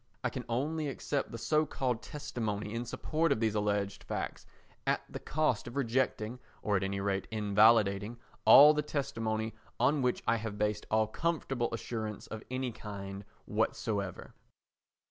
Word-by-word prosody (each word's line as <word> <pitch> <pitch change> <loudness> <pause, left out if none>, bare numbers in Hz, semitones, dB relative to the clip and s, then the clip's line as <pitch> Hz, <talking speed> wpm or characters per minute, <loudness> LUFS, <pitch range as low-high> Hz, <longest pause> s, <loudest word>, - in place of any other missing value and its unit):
I - - 0
can - - -5
only 150 +6 -1
accept 140 0 -2
the 115 - -5
so 155 +6 +2
called 125 -5 -1
testimony 110 -8 -4
in 115 +1 -2
support 160 +6 0
of 140 - +2
these 110 -2 +1
alleged 100 -1 -1
facts - - -4 0.4
at - - +2
the - - -7
cost 155 -8 0
of 120 - -8
rejecting, 125 -3 0 0.2
or 105 - +1
at 95 - +2
any 100 0 -1
rate 95 -1 -1
invalidating, 105 0 +4 0.3
all 150 +2 +10
the 150 - +1
testimony 115 -7 -2 0.3
on 145 0 +3
which 125 -1 0
I 115 - +4
have 110 -2 -5
based 105 0 -1
all 110 0 +3
comfortable 135 -1 -1
assurance 110 -2 -4
of 110 - -7
any 130 -1 -2
kind 100 -2 -7 0.2
whatsoever. 105 -2 -2
110 Hz, 155 wpm, -32 LUFS, 105-130 Hz, 0.4 s, all